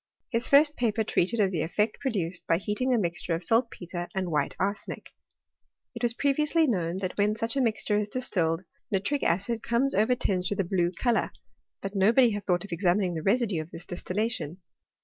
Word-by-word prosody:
His 235 Hz, 0 st, 0 dB
first 295 Hz, +2 st, +5 dB
paper 225 Hz, -2 st, +1 dB
treated 220 Hz, +2 st, 0 dB
of 195 Hz, -2 st, +3 dB
the 165 Hz, -4 st, -1 dB
effect 210 Hz, +7 st, 0 dB
produced 185 Hz, -10 st, -2 dB
by 165 Hz, -, +3 dB
heating 210 Hz, +7 st, -1 dB
a 245 Hz, -, +4 dB
mixture 170 Hz, -3 st, -1 dB
of 165 Hz, -, -5 dB
saltpetre 180 Hz, -5 st, -1 dB
and 185 Hz, -2 st, -1 dB
white 150 Hz, -2 st, 0 dB
arsenic. 200 Hz, +2 st, -3 dB, 0.8 s
It -, -, -8 dB
was 235 Hz, -1 st, +2 dB
previously 300 Hz, +4 st, +2 dB
known, 180 Hz, -, 0 dB
that 185 Hz, -2 st, -3 dB
when 210 Hz, +1 st, +3 dB
such 230 Hz, +2 st, -1 dB
a 275 Hz, -, +2 dB
mixture 215 Hz, -3 st, +1 dB
is 210 Hz, 0 st, -2 dB
distilled 180 Hz, -9 st, -1 dB, 0.3 s
nitric 205 Hz, +9 st, 0 dB
acid 200 Hz, +6 st, 0 dB
comes 240 Hz, +4 st, +1 dB
over 220 Hz, +5 st, +3 dB
tinged 185 Hz, -6 st, 0 dB
with 205 Hz, -, -3 dB
a -, -, +3 dB
blue 175 Hz, -1 st, 0 dB
colour; 235 Hz, +5 st, 0 dB, 0.5 s
but 195 Hz, 0 st, -4 dB
nobody 230 Hz, +5 st, +5 dB
had 205 Hz, -2 st, -5 dB
thought 175 Hz, -2 st, +2 dB
of 200 Hz, -, -12 dB
examining 180 Hz, +1 st, +1 dB
the 160 Hz, -, -3 dB
residue 200 Hz, -3 st, +1 dB
of 155 Hz, -, -10 dB
this 170 Hz, -, -9 dB
distillation. 185 Hz, -2 st, -2 dB
205 Hz, 190 wpm, -27 LUFS, 175-235 Hz, 0.8 s, first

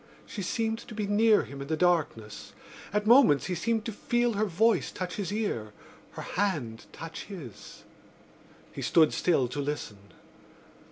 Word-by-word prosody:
She 205 Hz, -, -6 dB
seemed 225 Hz, +4 st, -1 dB
to 220 Hz, -, -10 dB
be 210 Hz, -1 st, -1 dB
near 210 Hz, +1 st, +4 dB
him 140 Hz, +4 st, -9 dB
in 140 Hz, -, -6 dB
the 160 Hz, +1 st, -1 dB
darkness. 155 Hz, -11 st, 0 dB, 0.4 s
At 210 Hz, +1 st, 0 dB
moments 230 Hz, -, +6 dB
he 185 Hz, -, -2 dB
seemed 220 Hz, +5 st, -1 dB
to 230 Hz, -, -3 dB
feel 240 Hz, +2 st, 0 dB
her 210 Hz, +1 st, +1 dB
voice 220 Hz, +6 st, +2 dB
touch 180 Hz, -1 st, -5 dB
his 200 Hz, -3 st, -3 dB
ear, 160 Hz, -, -2 dB, 0.4 s
her -, -, -7 dB
hand 140 Hz, -, -2 dB
touch 165 Hz, 0 st, -8 dB
his. 165 Hz, -, -10 dB, 0.9 s
He -, -, -7 dB
stood 160 Hz, -3 st, +4 dB
still 150 Hz, -8 st, +2 dB
to 145 Hz, -, -5 dB
listen. 140 Hz, -8 st, -4 dB
180 Hz, 160 wpm, -28 LUFS, 145-215 Hz, 0.9 s, moments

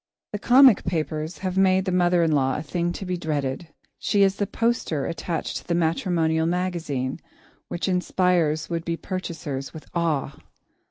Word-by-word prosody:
The 210 Hz, -, -2 dB
comic 255 Hz, 0 st, +6 dB
papers 160 Hz, -1 st, -2 dB
have 185 Hz, 0 st, 0 dB
made 190 Hz, 0 st, +4 dB
the 185 Hz, -, -1 dB
mother 175 Hz, -1 st, +3 dB
in 165 Hz, -, +2 dB
law 135 Hz, -3 st, +2 dB
a 150 Hz, -, -4 dB
thing 170 Hz, +2 st, -1 dB
to 195 Hz, -, -6 dB
be 180 Hz, -1 st, -2 dB
dreaded. 150 Hz, -1 st, -2 dB, 0.3 s
She 200 Hz, -1 st, +2 dB
is 195 Hz, 0 st, +2 dB
the 205 Hz, -, -1 dB
poster 230 Hz, -, -1 dB
attached 165 Hz, 0 st, -3 dB
to -, -, -10 dB
the 170 Hz, -, +1 dB
matrimonial 165 Hz, -1 st, +1 dB
magazine 170 Hz, -7 st, -2 dB, 0.5 s
which 175 Hz, -, -3 dB
inspires 180 Hz, -4 st, +1 dB
would 165 Hz, -1 st, -3 dB
be 165 Hz, 0 st, -2 dB
purchasers 160 Hz, -8 st, -5 dB
with 155 Hz, -, -9 dB
awe. 155 Hz, -5 st, 0 dB
170 Hz, 165 wpm, -24 LUFS, 155-185 Hz, 0.5 s, comic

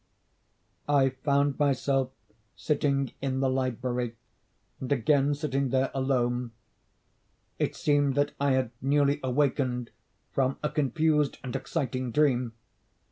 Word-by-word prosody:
I 140 Hz, -2 st, +4 dB
found 140 Hz, +1 st, 0 dB
myself 135 Hz, -2 st, +1 dB, 0.5 s
sitting 140 Hz, -3 st, 0 dB
in 135 Hz, -1 st, -1 dB
the 135 Hz, -1 st, +2 dB
library, 125 Hz, -2 st, -2 dB, 0.6 s
and 130 Hz, -, -5 dB
again 140 Hz, +2 st, +3 dB
sitting 140 Hz, -2 st, -1 dB
there 130 Hz, +1 st, +1 dB
alone. 125 Hz, -3 st, 0 dB, 1.1 s
It -, -, 0 dB
seemed 145 Hz, -2 st, +2 dB
that 145 Hz, 0 st, +2 dB
I 140 Hz, -1 st, +2 dB
had 130 Hz, -3 st, 0 dB
newly 140 Hz, +1 st, +2 dB
awakened 130 Hz, -2 st, 0 dB, 0.4 s
from 135 Hz, 0 st, 0 dB
a 150 Hz, -, 0 dB
confused 150 Hz, 0 st, +1 dB
and 130 Hz, 0 st, -5 dB
exciting 130 Hz, -1 st, -2 dB
dream. 125 Hz, -4 st, +2 dB
135 Hz, 115 wpm, -28 LUFS, 130-145 Hz, 1.1 s, I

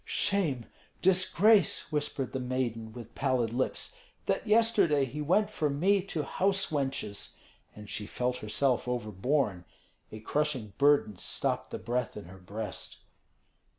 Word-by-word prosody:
"Shame, 155 Hz, -, 0 dB, 0.4 s
disgrace," 190 Hz, +1 st, +4 dB
whispered 145 Hz, -3 st, -2 dB
the 130 Hz, -, -1 dB
maiden, 125 Hz, -3 st, -2 dB
with 115 Hz, -1 st, -10 dB
pallid 130 Hz, -5 st, 0 dB
lips, 130 Hz, -, -2 dB, 0.3 s
"that -, -, -1 dB
yesterday 210 Hz, -10 st, +4 dB
he 145 Hz, +4 st, -5 dB
went 205 Hz, +8 st, +2 dB
from 145 Hz, -7 st, -1 dB
me 195 Hz, +3 st, +4 dB
to 160 Hz, -6 st, -2 dB
house 195 Hz, +1 st, +1 dB
wenches!" 135 Hz, -8 st, -2 dB, 0.4 s
and 105 Hz, 0 st, -10 dB
she 105 Hz, 0 st, -3 dB
felt 125 Hz, +3 st, -1 dB
herself 125 Hz, +4 st, 0 dB
overborne. 110 Hz, -3 st, 0 dB, 0.5 s
A 110 Hz, -, -7 dB
crushing 130 Hz, -3 st, -1 dB
burden 140 Hz, -8 st, +4 dB
stopped -, -, -2 dB
the -, -, -4 dB
breath 125 Hz, 0 st, -2 dB
in 105 Hz, -, -7 dB
her 95 Hz, +2 st, -12 dB
breast. 105 Hz, +2 st, -6 dB
135 Hz, 135 wpm, -30 LUFS, 110-155 Hz, 0.5 s, disgrace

